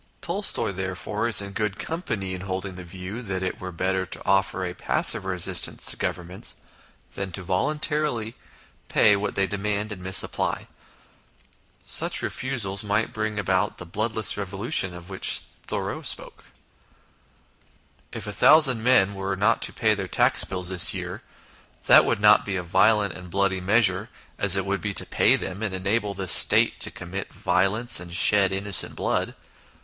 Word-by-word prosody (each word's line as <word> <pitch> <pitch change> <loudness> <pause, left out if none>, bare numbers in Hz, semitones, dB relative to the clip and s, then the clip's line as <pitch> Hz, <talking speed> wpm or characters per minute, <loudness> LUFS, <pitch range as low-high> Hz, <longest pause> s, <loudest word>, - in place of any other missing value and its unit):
Tolstoy, 190 - 0
therefore, 95 +4 -4
is 110 -3 +3
in 100 - -8
good 105 -1 -3
company 110 - -5
in 90 - -6
holding 95 0 -5
the 90 0 -9
view 95 +6 -8
that 95 -5 -4
it 95 - -4
were 95 0 -7
better 95 +2 -2
to - - -8
offer 95 -1 0
a 90 - -5
passive - - +2
resistance - - 0
to - - +1
Governments 90 +1 -5 0.6
than 95 -1 -6
volun 95 - -3
tarily 150 -8 -2
to - - -28 0.5
pay 105 -1 +3
what 100 +1 -4
they 100 - +1
demand 105 +1 -3
and 95 -3 -7
misapply. 95 +1 0 1.2
Such - - 0
refusals 110 -7 -2
might 105 0 -2
bring 110 -1 -4
about 95 0 -1
the 90 - -9
bloodless 110 +4 -1
revolution 100 - -1
of 90 +2 -12
which 95 - 0 0.2
Thoreau - - -4
spoke - - -2 0.8
" - - -37 0.7
If - - -7
a - - -6
thousand 140 -7 +4
men 115 -5 +2
were 95 0 -4
not 105 +4 +1
to - - +1
pay 110 -2 +1
their 100 -3 -5
tax - - +3
bills 90 -1 -3
this 90 -2 +6
year, - - -7 0.6
that - - +6
would - - -1
not 105 0 +5
be 100 - -4
a 90 - -3
violent 100 +3 +1
and 90 0 -11
bloody 95 0 -1
measure, 100 +1 +2 0.3
as 100 -2 +7
it 95 -1 -1
would 100 0 -3
be 100 -2 -4
to - - +3
pay - - +3
them, 95 +3 -6
and 105 -4 -3
enable 100 +2 -2
the 95 -1 -5
State 90 - +5
to - - +3
commit 90 +2 -8
violence 95 +6 +1
and 85 -1 -6
shed 100 +1 +4
innocent 95 +1 +4
blood. - - -2
100 Hz, 170 wpm, -23 LUFS, 95-110 Hz, 1.2 s, as